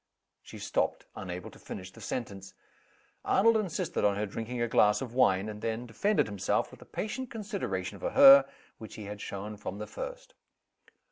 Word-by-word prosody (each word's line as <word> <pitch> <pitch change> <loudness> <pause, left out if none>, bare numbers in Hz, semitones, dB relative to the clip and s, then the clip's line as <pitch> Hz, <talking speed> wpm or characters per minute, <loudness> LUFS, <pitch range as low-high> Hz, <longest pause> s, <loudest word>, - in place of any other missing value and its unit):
She - - -11
stopped, - - -1
unable 90 -1 -6
to - - -16
finish 95 0 -8
the - - -14
sentence. 100 -6 -5 0.7
Arnold 230 +3 +4
insisted 205 -7 -1
on 100 -1 +3
her 105 +1 -1
drinking 115 +4 -5
a 120 - +1
glass 105 -2 +4
of 125 -3 -6
wine 95 -6 +3
and 105 -1 -7
then 115 +1 -2
defended 200 - +1
himself 100 -3 -1
with - - -14
the - - -15
patient 245 +4 -4
consideration 195 - -4
for - - -2
her 275 0 +9 0.3
which 110 - -9
he 110 - -7
had 105 +1 -7
shown 105 +2 -6
from 100 -1 -6
the 105 - -5
first. - - -8
110 Hz, 180 wpm, -30 LUFS, -, 0.7 s, her